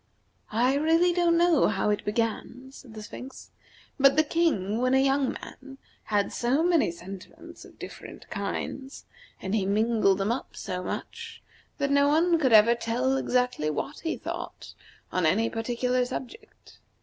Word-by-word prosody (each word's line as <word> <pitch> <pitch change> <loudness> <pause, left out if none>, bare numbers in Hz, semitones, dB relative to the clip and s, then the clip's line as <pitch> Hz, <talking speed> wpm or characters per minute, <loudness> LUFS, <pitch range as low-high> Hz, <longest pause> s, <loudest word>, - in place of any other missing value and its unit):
"I 240 +5 +2
really 325 +5 +3
don't 340 -1 +3
know 340 -3 +4
how 210 0 0
it 210 - -1
began," 230 +4 -3
said 250 -4 -13
the 215 - -7
Sphinx, 255 +5 -10 0.5
"but 275 0 +6
the 310 - +5
King, 285 - 0
when 255 +1 +2
a - - +5
young 270 0 +2
man, 270 0 -11 0.3
had 205 -2 0
so 260 +6 +1
many 340 - +3
sentiments 195 - -11
of - - -17
different - - -10
kinds, 270 +1 -5 0.4
and 190 - -3
he 215 -3 +1
mingled 215 -1 +2
them 200 +2 0
up 245 - -4
so 180 0 -4
much, 180 - -7 0.3
that 280 0 -1
no 280 0 +4
one 330 +3 +3
could 265 -5 +2
ever 220 +1 +7
tell 240 +3 -1
exactly 250 -11 0
what 275 - -4
he 325 - -3
thought - - -7 0.4
on 180 -3 +1
any 225 +8 +1
particular 250 +2 0
subject. 260 - -9
250 Hz, 160 wpm, -27 LUFS, 215-285 Hz, 0.5 s, ever